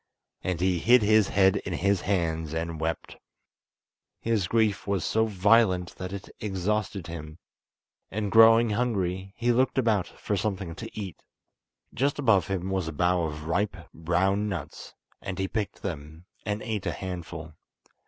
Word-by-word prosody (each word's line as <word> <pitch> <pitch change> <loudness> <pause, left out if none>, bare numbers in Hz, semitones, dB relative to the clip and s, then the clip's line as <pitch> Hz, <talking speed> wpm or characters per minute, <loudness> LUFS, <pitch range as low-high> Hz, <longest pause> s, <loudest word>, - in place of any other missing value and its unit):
And 90 -3 -1
he 90 -1 +2
hid 120 +5 +5
his 110 -1 +4
head 95 0 +4
in 95 - -4
his 100 +2 +1
hands 80 -5 -1
and 80 -1 -3
wept. 80 +1 -3 1.0
His 110 -5 0
grief 110 -3 +1
was 100 -3 0
so 110 0 +2
violent, 100 -3 +3
that 90 0 -5
it 100 -1 -7
exhausted 100 -1 -2
him, 80 -2 -8 0.7
and 105 0 -3
growing 115 0 +7
hungry 95 -5 -1
he 120 +1 +2
looked 130 +3 +2
about 110 -7 +2
for 105 - -4
something 95 -3 -2
to 115 +6 -7
eat. 95 -5 -7 0.7
Just 140 +3 0
above 115 -10 +3
him 95 -1 -2
was 95 -3 -1
a - - -3
bough 90 +2 +2
of 75 -1 -5
ripe, 95 +6 -1 0.2
brown 95 +6 +1
nuts, 85 -7 -7 0.3
end 95 -1 -5
he 95 - -1
picked 105 0 -4
them 80 -1 -6 0.2
and 105 +1 -2
ate 105 -4 -3
a - - -1
handful. 85 -4 -6
95 Hz, 155 wpm, -27 LUFS, 85-105 Hz, 1.0 s, growing